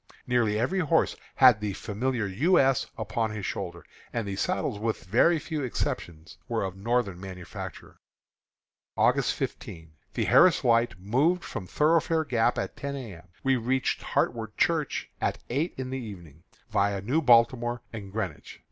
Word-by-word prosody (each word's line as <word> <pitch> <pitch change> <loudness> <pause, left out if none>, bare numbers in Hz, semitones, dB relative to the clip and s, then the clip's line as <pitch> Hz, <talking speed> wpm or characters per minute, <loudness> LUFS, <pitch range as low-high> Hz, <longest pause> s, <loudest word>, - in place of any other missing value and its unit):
Nearly 120 -4 +1
every 150 - 0
horse 165 -1 +2 0.2
had 125 -5 +6
the 105 -2 -2
familiar 115 +4 -2
"U. 135 - +2
S." 135 -1 +3
upon 110 +1 -1
his 105 -2 -5
shoulder; - - -5 0.3
and 115 -3 -3
the 100 - -3
saddles, 130 - -1
with 110 0 -2
very 165 - +4
few 155 0 -4
exceptions, 85 - -4
were - - 0
of 95 -1 -4
Northern 100 -3 -1
manufacture. 90 -2 -8 1.0
August - - +3
15. 80 -2 -6 0.2
The - - 0
Harris - - +5
Light 115 -4 +3
moved 140 - +1
from 90 - -6
Thoroughfare 160 - +2
Gap 120 -2 +1
at - - -3
ten 140 0 -4
A. 115 -10 -7
M. 85 - -17 0.2
We 135 -1 +3
reached 130 +3 0
Hartwood 110 -3 -1
Church 160 -4 0
at - - 0
eight 150 +7 -1
in 130 -1 -4
the 130 - -3
evening, 85 - -10 0.3
viâ 100 -1 +1
New 135 +10 +1
Baltimore 120 -2 +3
and 100 -3 -7
Greenwich. 95 -7 -5
115 Hz, 155 wpm, -27 LUFS, 100-135 Hz, 1.0 s, had